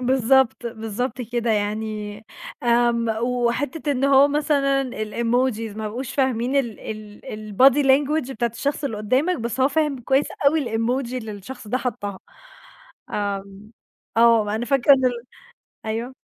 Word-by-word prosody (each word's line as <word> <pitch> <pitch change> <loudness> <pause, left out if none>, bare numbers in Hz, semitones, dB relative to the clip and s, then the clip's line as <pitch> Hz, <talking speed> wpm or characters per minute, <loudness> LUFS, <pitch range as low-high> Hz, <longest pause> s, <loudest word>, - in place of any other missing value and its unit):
بالضبط، 255 -1 +2
بالضبط 230 +3 -4
كده. 240 0 -2
يعني 210 0 -2 0.5
آمم 235 -1 +2
وحتّة 250 +5 -1
إن 265 0 -1
هو 275 +1 +6
مثلًا 275 -3 +1
الemojis 230 0 -1
ما 215 -1 -3
بقوش 245 +4 -6
فاهمين 260 -1 0
ال 240 -6 -1
ال 215 -1 -8 0.3
الbody 270 +5 +5
language 275 +1 +2
بتاعة 235 -1 -1
الشخص 285 +4 -2
اللي 225 -6 -2
قدامك، 260 - +1
بس 235 +3 -3
هو 265 - +5
فاهم 300 -2 0
كويس 270 +4 +2 0.2
اوي 305 +1 +3
الemoji 245 +2 -1
اللي 225 -4 -5
الشخص 210 +3 -9
ده 255 +4 0
حطّها. 205 -7 -4 0.9
آمم، 200 +1 -4 0.4
آه 225 -2 +4
أنا 230 - -2
فاكرة 275 +1 +5
إن 260 -1 -1
ال 245 -2 0 0.6
أيوه. 230 +4 -3
240 Hz, 140 wpm, -22 LUFS, 220-270 Hz, 0.9 s, هو